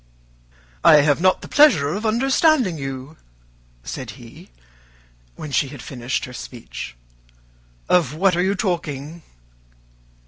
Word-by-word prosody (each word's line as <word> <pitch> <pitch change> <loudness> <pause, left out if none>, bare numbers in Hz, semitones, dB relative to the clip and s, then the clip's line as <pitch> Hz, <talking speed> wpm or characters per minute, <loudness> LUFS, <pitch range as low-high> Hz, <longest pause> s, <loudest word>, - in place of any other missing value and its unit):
"I 150 - +8
have 145 +2 +2
not 185 0 +2
the - - -8
pleasure 270 - +5
of 215 +3 -2
understanding 260 - +2
you," 135 +2 -7 0.7
said - - -6
he, - - -14 0.9
when 150 - -8
she 140 - +1
had 135 -3 -10
finished 125 0 -3
her 125 - -11
speech. 115 - -8 0.9
"Of 155 -5 +2
what 185 +2 +2
are 175 - +1
you 190 +2 +1
talking?" 165 -5 -3
160 Hz, 125 wpm, -21 LUFS, 135-195 Hz, 0.9 s, I